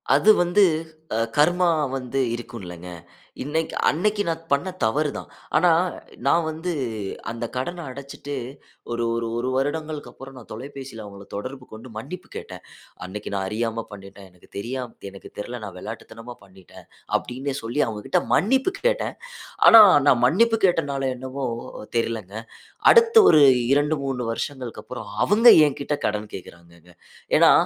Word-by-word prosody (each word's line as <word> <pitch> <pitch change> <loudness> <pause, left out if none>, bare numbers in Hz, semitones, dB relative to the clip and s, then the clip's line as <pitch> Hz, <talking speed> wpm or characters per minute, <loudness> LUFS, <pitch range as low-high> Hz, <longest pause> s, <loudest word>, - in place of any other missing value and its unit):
அது 205 +9 +4
வந்து, 175 +4 +3 0.5
அ, - - 0 0.2
கர்மா 175 +4 +3 0.3
வந்து 130 +1 -3 0.2
இருக்கும்லங்க. 90 -7 -9 0.6
இன்னைக்கு 160 +3 -2
அன்னைக்கு 205 +7 0
நான் 165 0 -2
பண்ண 140 +7 +1
தவறு 145 +7 +1
தான். - - -7 0.3
ஆனா, 175 +2 +4 0.6
நான் 165 +4 +3
வந்து 160 +3 -3 0.6
அந்த 115 +1 -4
கடனை 170 +7 -4
அடச்சுட்டு, 140 +1 -8 0.6
ஒரு 120 0 -1
ஒரு 115 0 -2
ஒரு 125 +2 -1
வருடங்களுக்கு 150 +2 -2
அப்புறம், 135 0 -12
நான் 120 - -13
தொலைபேசியில 130 -1 -8
அவுங்கள 100 0 -11
தொடர்பு 130 +5 -6
கொண்டு, 110 +3 -10
மன்னிப்பு 180 +11 -8
கேட்டேன். - - -8 0.4
"அன்னைக்கு 105 +3 -7
நான் 95 -1 -1
அறியாம 115 +2 -2
பண்ணிட்டேன். 100 0 -12
எனக்கு 90 - -23
தெரியாம 125 +4 -4 0.2
எனக்கு 100 0 -12
தெரில. 120 +4 -5
நான் 100 -3 -8
விளையாட்டுத்தனமா 115 +3 -9
பண்ணிட்டேன்." 95 -2 -17 0.3
அப்படின்னே 135 +3 -5
சொல்லி 120 +6 -1
அவுங்க 105 -2 -6
கிட்ட 180 - +2
மன்னிப்பு 265 - +2
கேட்டேன். - - 0 0.5
ஆனா, 225 -1 +11 0.2
நான் 120 - +5
மன்னிப்பு 225 - +3
கேட்டனால 140 -6 0
என்னவோ, 130 +2 -5 0.5
தெரிலங்க. 110 -4 -3 0.6
அடுத்த 460 -1 +5 0.2
ஒரு 155 -2 +6 0.3
2,3 140 -4 0
வருஷங்களுக்கு 125 -3 -5
அப்புறம், - - -8 0.2
அவுங்க 220 +5 +4 0.2
எங்கிட்ட 145 +1 -3
கடன் 105 0 -2
கேக்குறாங்கங்க. 85 -1 -14 0.4
ஏனா, - - +7
130 Hz, 135 wpm, -23 LUFS, 110-155 Hz, 0.6 s, ஆனா